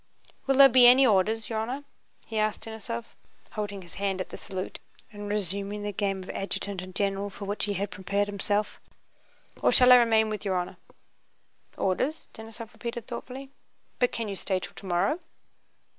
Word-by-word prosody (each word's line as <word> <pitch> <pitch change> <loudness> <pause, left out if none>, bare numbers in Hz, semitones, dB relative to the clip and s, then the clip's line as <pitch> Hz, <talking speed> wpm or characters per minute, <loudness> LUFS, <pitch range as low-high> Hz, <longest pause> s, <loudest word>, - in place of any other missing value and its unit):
"Will 270 - +3
there 275 0 +10
be 250 -1 +7
any 260 +2 +8
orders, 220 0 +2
your 220 -1 -2
honor?" 250 +6 -3 0.4
he 220 -1 -3
asked 215 0 0
Denísov, 225 +1 -5 0.5
holding 205 -3 -4
his 170 - -14
hand 195 -1 0
at 185 - -4
the - - -7
salute 190 -2 -6 0.3
and 205 0 -6
resuming 200 +1 -2
the 205 - -2
game 195 -1 -1
of - - -12
adjutant 195 -1 -3
and 185 0 -10
general 200 0 0
for 200 +1 -8
which 205 +1 -1
he 205 - -1
had 200 +2 -3
prepared 200 +1 -1
himself, 205 +1 -1 0.8
"or - - +4
shall 250 -1 +7
I 250 - +11
remain 225 -2 +4
with 210 - -4
your 195 -2 0
honor?" 180 -1 -2 1.0
"Orders?" 265 - 0
Denísov 225 0 -9
repeated 235 -1 -5
thoughtfully. 260 +2 -7 0.5
"But 245 - +3
can 230 -2 -3
you 200 - -4
stay 190 0 0
till - - -8
tomowwow?" 190 - 0
205 Hz, 175 wpm, -28 LUFS, 195-235 Hz, 1.0 s, I